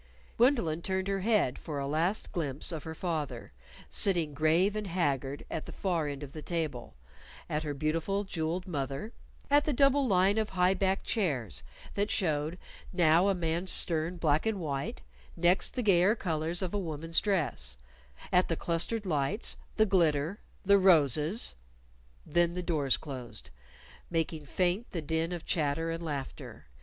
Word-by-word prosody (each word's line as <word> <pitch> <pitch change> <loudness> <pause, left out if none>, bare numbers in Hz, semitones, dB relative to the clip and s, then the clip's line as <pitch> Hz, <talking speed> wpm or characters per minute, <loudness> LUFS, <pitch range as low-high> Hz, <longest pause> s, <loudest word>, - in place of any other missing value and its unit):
Gwendolyn 230 - +3
turned 190 +1 -1
her 195 0 0
head 200 - +2
for 150 -3 -5
a 140 - -2
last 165 +8 0
glimpse 150 -4 -2
of 160 -3 -5
her 160 0 -6
father, 150 -9 -3 0.4
sitting, 170 -7 +1
grave 160 +7 +3
and 210 -1 -3
haggard, 145 -6 -1
at 160 - -4
the - - -7
far 170 -6 -1
end 145 0 -5
of 140 - -9
the 155 - -7
table; 150 - -3 0.5
at 150 - -1
her 150 -2 -4
beautiful, 165 +7 -1
jeweled 175 -1 -3
mother; 140 - -4 0.4
at 290 +1 +5
the 300 - +1
double 275 +1 +4
line 195 +1 +3
of 215 - -1
high 185 0 +3
backed 195 0 0
chairs 145 - -1 0.3
that 205 +1 0
showed, 155 -3 0 0.3
now 170 +1 +4
a 200 - +2
man's 170 +1 -1
stern 165 +1 +2
black 155 +3 +1
and 215 -3 0
white, 140 -4 -3 0.4
next 175 +2 +3
the 250 - -1
gayer 195 +1 +4
colors 165 -2 -2
of 185 - -3
a 205 - 0
woman's 165 -2 +1
dress; 135 - 0 0.6
at 180 +1 +4
the 165 - 0
clustered 175 +7 -1
lights; 165 - 0 0.2
the 215 - +5
glitter; 170 -2 +2 0.3
the 200 +1 +6
roses 160 - +3 0.7
Then 175 0 +2
the 180 0 -3
doors 150 -6 +1
closed, 120 - -8 0.6
making 160 -2 -2
faint 185 - 0
the 170 - -2
din 160 +2 -1
of 175 -2 -5
chatter 160 +1 0
and 165 +1 -4
laughter. 145 -5 -6
170 Hz, 160 wpm, -30 LUFS, 150-190 Hz, 0.7 s, the